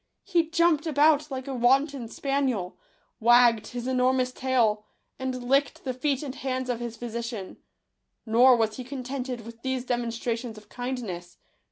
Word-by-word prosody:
He 340 -4 +1
jumped 335 -2 +2
about 300 0 +3
like 265 -1 -5
a 275 - -3
wanton 265 +1 +2
spaniel, 260 -7 -1 0.4
wag 240 0 +6
ged 215 - -11
his 245 -1 -6
enormous 255 0 +2
tail, 240 -5 +1 0.4
and 255 -1 -3
licked 275 +3 +1
the 255 - -2
feet 275 +2 -1
and 270 -3 -5
hands 260 -2 -2
of 235 - -3
his 235 -1 -5
physician. 230 -4 -5 0.7
Nor 245 +3 +6
was 220 -2 0
he 255 - -5
contented 255 -1 -5
with 230 +1 -12
these 260 -1 -2
demonstrations 235 -1 -2
of 210 - -14
kindness. 225 -9 -5
250 Hz, 155 wpm, -27 LUFS, 235-270 Hz, 0.7 s, wag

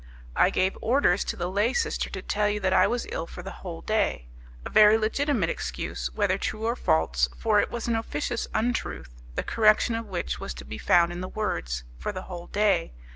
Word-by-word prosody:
I - - +5
gave 190 +1 +1
orders 225 -7 +3
to - - -2
the 175 - -2
lay 205 +6 +1
sister 455 -2 -1
to - - -6
tell 210 0 +1
you 210 0 -1
that 190 -1 +1
I - - +5
was 240 0 -1
ill 165 - -3
for 180 - -9
the 195 - -6
whole 170 -3 -6
day; 210 - 0 0.4
a - - -4
very 215 0 +7
legitimate 225 - 0
excuse; - - -4
whether - - +1
true 215 +1 -3
or 235 +1 +1
false, 65 - +1
for - - +3
it - - +1
was 235 -1 -4
an 235 - +1
officious 230 +1 -2
untruth, 220 - -2 0.2
the - - -1
correction 215 +1 +3
of 225 -1 -3
which, 180 -3 -3
was 65 - -5
to 65 +1 -9
be 70 +1 -7
found 170 - +4
in 175 +1 -5
the 185 - -5
words: 60 - -3 0.2
for 65 - -3
the 185 - -6
whole 175 -2 -8
day. 205 - +1
200 Hz, 215 wpm, -26 LUFS, 165-225 Hz, 0.4 s, very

